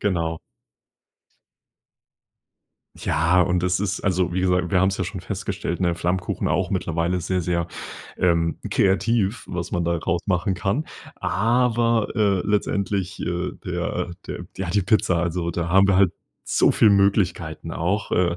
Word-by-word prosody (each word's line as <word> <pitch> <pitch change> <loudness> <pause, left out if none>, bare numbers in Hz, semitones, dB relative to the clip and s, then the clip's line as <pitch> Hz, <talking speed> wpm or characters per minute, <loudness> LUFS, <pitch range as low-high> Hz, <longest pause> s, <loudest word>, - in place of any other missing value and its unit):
Genau. 85 -5 -1 2.6
Ja, 85 +4 +2
und 90 0 +1
das 90 0 +1
ist 100 -1 -2
also 90 -2 0
wie 90 - 0
gesa 90 -1 +1
wir 90 -3 +2
haben 95 - +4
es 95 - -2
ja 95 - -1
schon 95 0 -5
festgestellt, 95 -1 -4
ne 85 -2 +2
Flammkuchen 90 +2 -1
auch 95 +3 0
mittlerweile 85 -1 -1
sehr, 90 +1 -1
sehr, 85 0 -1 0.5
ähm, 85 -2 +1
kreativ, 100 +2 +1
was 90 -1 -4
man 85 -1 -1
daraus 85 +1 -1
machen 95 +1 +1
kann, 100 - -1 0.3
aber, 115 +2 +1
äh, 100 -4 +2
letztendlich, 100 -2 -1
äh, 90 +1 -2
der 90 0 -2 0.2
der 90 - -6
ja, 95 -2 -3
die 100 0 +2
Pizza 95 -3 +2
also 85 0 -1
da 85 -1 -2
haben 95 +2 +5
wir 100 -2 +3
halt 95 -3 +5 0.3
so - - +3
viel 110 - +5
Möglichkeiten 95 -5 +1
auch, 95 +5 -1
äh 85 -1 +1
90 Hz, 150 wpm, -23 LUFS, 85-100 Hz, 2.6 s, haben